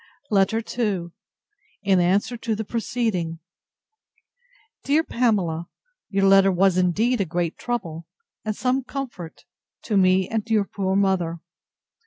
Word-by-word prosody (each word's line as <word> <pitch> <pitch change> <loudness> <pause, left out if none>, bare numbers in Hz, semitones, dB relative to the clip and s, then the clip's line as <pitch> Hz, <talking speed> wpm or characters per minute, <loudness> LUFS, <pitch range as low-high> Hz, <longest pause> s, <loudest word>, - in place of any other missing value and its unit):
LETTER 210 +3 +2 0.2
II 195 -7 0 0.7
[In 195 -2 +3
answer 195 +7 +2
to 230 -1 -2
the 220 - -3
preceding.] 215 -8 -2 1.5
DEAR 300 +3 +2
PAMELA, 190 - 0 0.4
Your 195 -1 +1
letter 195 0 +6
was 190 0 +3
indeed 205 +7 +2
a - - +1
great 170 0 -2
trouble, 170 -9 -4 0.4
and 215 -1 -2
some 255 +3 0
comfort, 245 - -7 0.4
to 210 - 0
me 185 0 +4
and 225 0 -3
your 215 -3 +3
poor 190 -1 -2
mother. 185 -4 +1
195 Hz, 125 wpm, -23 LUFS, 180-225 Hz, 1.5 s, letter